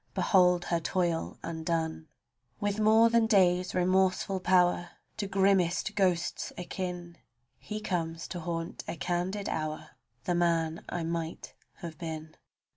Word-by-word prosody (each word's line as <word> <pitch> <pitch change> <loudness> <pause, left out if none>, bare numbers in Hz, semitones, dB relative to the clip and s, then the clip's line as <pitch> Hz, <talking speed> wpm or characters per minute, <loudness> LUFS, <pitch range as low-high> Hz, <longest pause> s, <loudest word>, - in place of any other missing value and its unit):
Behold 180 -3 +4
her 170 - 0
toil 170 -1 -1
undone, 160 -1 -2 0.5
With 205 0 -1
more 220 +2 +6
than 230 -1 +4
day's 185 -4 +3
remorseful 185 +1 +2
pow'r, 180 -1 +3 0.3
To 205 -2 -2
grimmest 195 0 +2
ghosts 180 -4 0
akin, 175 -1 -5 0.4
He 215 0 -5
comes 165 -5 -3
to 180 - -4
haunt 165 0 -4
a - - -3
candid 180 +6 -2
hour 155 0 -3
— 120 0 -45
The 175 - +1
man 165 -2 +1
I 175 -1 -3
might 165 0 -4 0.3
have 165 -4 -7
been. 160 -1 -6
175 Hz, 130 wpm, -29 LUFS, 165-190 Hz, 0.5 s, more